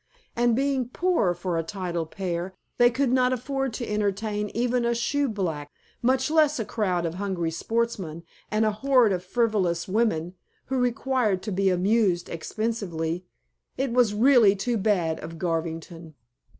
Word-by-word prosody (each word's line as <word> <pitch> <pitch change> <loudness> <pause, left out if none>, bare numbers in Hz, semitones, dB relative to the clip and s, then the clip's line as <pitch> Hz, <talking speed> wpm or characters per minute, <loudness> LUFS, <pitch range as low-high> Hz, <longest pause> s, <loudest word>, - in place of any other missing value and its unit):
And 240 -1 +3
being 265 -2 0
poor 330 - +1
for 175 -1 -2
a - - -1
titled 175 -3 -4
pair, 180 0 -4 0.2
they 240 0 +7
could 255 +1 0
not 255 0 +3
afford 270 +1 -2
to 240 0 -4
entertain 210 0 -1
even 245 +1 +1
a 235 0 +1
shoeblack, 210 - -1 0.3
much 260 +4 +2
less 305 -3 +3
a 225 - -1
crowd 185 -7 -1
of 165 - -2
hungry 180 -3 -2
sportsmen 190 -4 -2 0.3
and 215 +1 +1
a 215 - +2
horde 250 0 +3
of 180 -1 -3
frivolous 190 -5 0
women, 185 -5 0 0.3
who 265 0 -1
required 245 -5 0
to 210 - -4
be 195 +1 +2
amused 185 -1 +2
expensively. 180 -3 -3 0.5
It 265 -2 -1
was 240 -4 +3
really 230 -3 +6
too 230 +4 -1
bad 180 -6 +1
of 165 +1 -8
Garvington. 165 -1 -4
210 Hz, 150 wpm, -26 LUFS, 175-240 Hz, 0.5 s, they